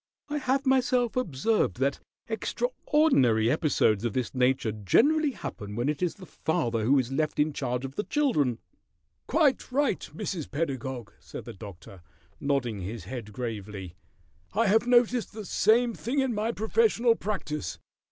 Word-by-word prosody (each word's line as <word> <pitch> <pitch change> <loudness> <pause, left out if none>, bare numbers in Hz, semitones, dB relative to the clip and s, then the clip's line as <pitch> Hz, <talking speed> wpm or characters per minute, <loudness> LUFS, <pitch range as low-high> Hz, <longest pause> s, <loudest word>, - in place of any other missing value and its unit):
I 295 0 -1
have 270 +1 0
myself 255 -2 +2
observed 195 - 0
that 135 +2 0 0.3
extraordinary 220 - +2
episodes 130 -9 +2
of 120 -3 -1
this 125 -2 -2
nature 130 -3 +2
generally 290 - +3
happen 105 - -7
when 120 +5 0
it 150 -2 -2
is 180 -2 0
the 190 - -12
father 120 -10 -1
who 140 +4 +4
is 130 -1 0
left 155 +3 -1
in 150 0 +2
charge 125 -2 -2
of 135 - -6
the 210 - -1
children." 155 - +1 0.7
"Quite 285 -5 +2
right, 285 +2 +1
Mrs. 190 -7 -4
Pedagog," 130 -7 -3
said - - -9
the - - -7
Doctor, 95 -1 -11 0.4
nodding 125 -8 -1
his 100 +2 -5
head 110 +1 -7
gravely. 105 -5 -5 0.6
"I 225 +4 +2
have 225 +4 +3
noticed 245 -1 +3
the 215 -1 -7
same 230 +5 +3
thing 245 +6 -4
in 265 -3 +2
my 215 +2 0
professional 235 - +3
practice. 170 - -4
150 Hz, 150 wpm, -28 LUFS, -, 0.7 s, who